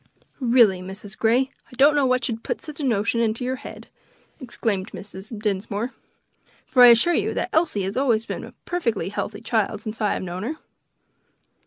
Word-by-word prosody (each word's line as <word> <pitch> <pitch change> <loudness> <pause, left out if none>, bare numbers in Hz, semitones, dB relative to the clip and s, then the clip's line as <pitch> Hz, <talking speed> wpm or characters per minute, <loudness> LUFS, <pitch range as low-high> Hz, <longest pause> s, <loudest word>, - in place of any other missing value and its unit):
"Really, 235 -7 +4
Mrs. 195 +2 -8
Grey, 250 +4 +2 0.2
I - - -15
don't 285 +3 +6
know 285 -2 +3
what 255 0 +1
should 225 -2 -3
put - - -3
such 305 -1 -9
a - - -3
notion 230 -2 +1
into 230 +2 0
your 260 +1 -2
head!" - - -10 0.5
exclaimed 225 -7 -3
Mrs. 195 +1 -8
Dinsmore, 210 +3 -2 0.7
"for 255 - +3
I 245 - +11
assure 240 +9 +6
you - - 0 0.2
Elsie 315 - +2
has 195 +2 -3
always 240 -4 +2
been - - -5
a - - -10
perfectly 235 - -1
healthy 210 +1 -4
child 220 -2 -1
since 220 0 -6
I 210 - +2
have - - -4
known 180 0 -5
her." 250 +10 -3
225 Hz, 180 wpm, -23 LUFS, 205-255 Hz, 0.7 s, I